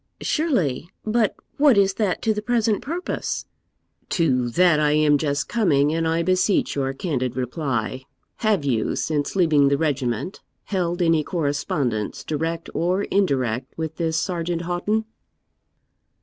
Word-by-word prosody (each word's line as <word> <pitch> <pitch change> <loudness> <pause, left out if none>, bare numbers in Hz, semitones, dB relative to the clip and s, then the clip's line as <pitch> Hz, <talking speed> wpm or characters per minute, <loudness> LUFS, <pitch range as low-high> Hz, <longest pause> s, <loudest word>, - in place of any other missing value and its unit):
'Surely; 185 - 0 0.2
but 220 -1 +1 0.2
what 280 -6 +5
is 195 -1 +4
that 200 -3 -1
to 220 - +2
the 210 - -3
present 225 -2 +1
purpose?' 345 +5 -3 0.6
'To 130 -8 +1
that 170 +3 +4
I 150 -1 +3
am 150 -1 +4
just 145 -1 -1
coming, 155 -10 +2
and 165 0 0
I 165 +1 +1
beseech 185 +3 +2
your 135 -1 -1
candid 130 -5 -2
reply. 130 -1 -2 0.3
Have 210 -9 +1
you, 115 -6 0
since 150 0 -1
leaving 155 -6 +4
the 140 0 +2
regiment, 140 - -2 0.2
held 175 -2 -1
any 165 -2 +3
correspondence, 145 - -2
direct 165 +2 -3
or 180 +4 0
indirect, 130 - 0
with 160 -1 -4
this 160 -2 0
Sergeant 170 -1 -2
Houghton?' 205 +6 -1
165 Hz, 135 wpm, -23 LUFS, 140-190 Hz, 0.6 s, what